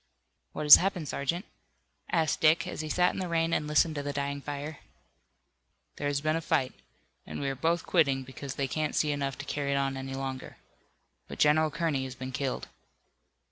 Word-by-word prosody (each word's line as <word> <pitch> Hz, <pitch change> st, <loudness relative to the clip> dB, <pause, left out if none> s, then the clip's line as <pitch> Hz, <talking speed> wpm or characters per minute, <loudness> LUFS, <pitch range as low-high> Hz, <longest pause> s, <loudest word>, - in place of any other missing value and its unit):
"What -, -, -4 dB
has 150 Hz, -, +12 dB
happened, 180 Hz, -4 st, -1 dB
Sergeant?" 170 Hz, +10 st, -2 dB, 0.7 s
asked 160 Hz, -3 st, +1 dB
Dick, 160 Hz, +2 st, +4 dB
as -, -, -5 dB
he 155 Hz, -, -5 dB
sat 180 Hz, +3 st, +2 dB
in -, -, -5 dB
the 185 Hz, -, -2 dB
rain 165 Hz, 0 st, 0 dB
and 150 Hz, -, 0 dB
listened 150 Hz, +2 st, +3 dB
to 145 Hz, -, -3 dB
the 145 Hz, 0 st, -3 dB
dying 140 Hz, 0 st, -3 dB
fire. 145 Hz, +1 st, -6 dB, 1.2 s
"There 145 Hz, -, -2 dB
has 145 Hz, -1 st, 0 dB
been 155 Hz, +1 st, +1 dB
a 165 Hz, -, -1 dB
fight, 130 Hz, -4 st, 0 dB, 0.5 s
and -, -, -6 dB, 0.2 s
both 170 Hz, +1 st, +2 dB
are -, -, -17 dB
quitting 140 Hz, -6 st, +2 dB
because 135 Hz, +1 st, -8 dB
they 140 Hz, -, -1 dB
can't 155 Hz, +3 st, -2 dB
see 150 Hz, -, +2 dB
enough 140 Hz, -2 st, -2 dB
to 140 Hz, -, -7 dB
carry 140 Hz, 0 st, -2 dB
it -, -, +1 dB
on 135 Hz, -1 st, 0 dB
any 135 Hz, 0 st, -5 dB
longer. 135 Hz, -1 st, -5 dB, 0.7 s
But -, -, -8 dB
General 155 Hz, +1 st, +4 dB
Kearney 150 Hz, -3 st, -1 dB
has 130 Hz, -1 st, -7 dB
been 130 Hz, +1 st, -6 dB
killed." 135 Hz, 0 st, -3 dB
145 Hz, 195 wpm, -29 LUFS, 135-160 Hz, 1.2 s, has